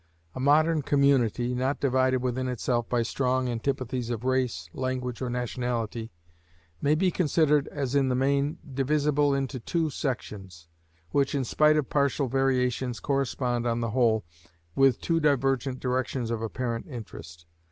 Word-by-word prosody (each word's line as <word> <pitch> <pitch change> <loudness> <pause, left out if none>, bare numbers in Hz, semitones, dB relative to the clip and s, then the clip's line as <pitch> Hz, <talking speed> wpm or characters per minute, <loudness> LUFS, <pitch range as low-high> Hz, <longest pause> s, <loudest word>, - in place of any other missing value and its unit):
A - - -7
modern 155 +4 +3
community, 130 -4 +2
not 130 +3 -1
divided 130 -1 +2
within 130 +1 -1
itself 120 -1 -1
by 120 -1 +1
strong 130 +1 0
antipathies 125 0 -2
of 120 -1 -3
race, 125 -10 0
language, 130 -1 -3
or 130 - -2
nationality, 120 -2 -3 0.7
may 145 +2 +3
be 180 +3 +2
considered 150 -3 +2
as 140 -3 -3
in 140 -2 +3
the 125 - +1
main 140 +4 +1 0.2
divisible 145 +1 +2
into 135 -1 -2
two 160 +5 -1
sections, 95 - -5 0.4
which, 140 0 +1
in 135 - 0
spite 150 +5 +3
of 145 -4 -1
partial 140 -1 +1
variations, 125 -1 0
correspond 125 -3 -1
on 115 0 0
the 115 -2 -2
whole 110 -3 +2 0.5
with 135 -3 +4
two 165 -1 0
divergent 135 -3 +1
directions 125 -1 -2
of 115 -1 -2
apparent 115 +1 -3
interest. 85 - -9
130 Hz, 145 wpm, -27 LUFS, 120-140 Hz, 0.7 s, with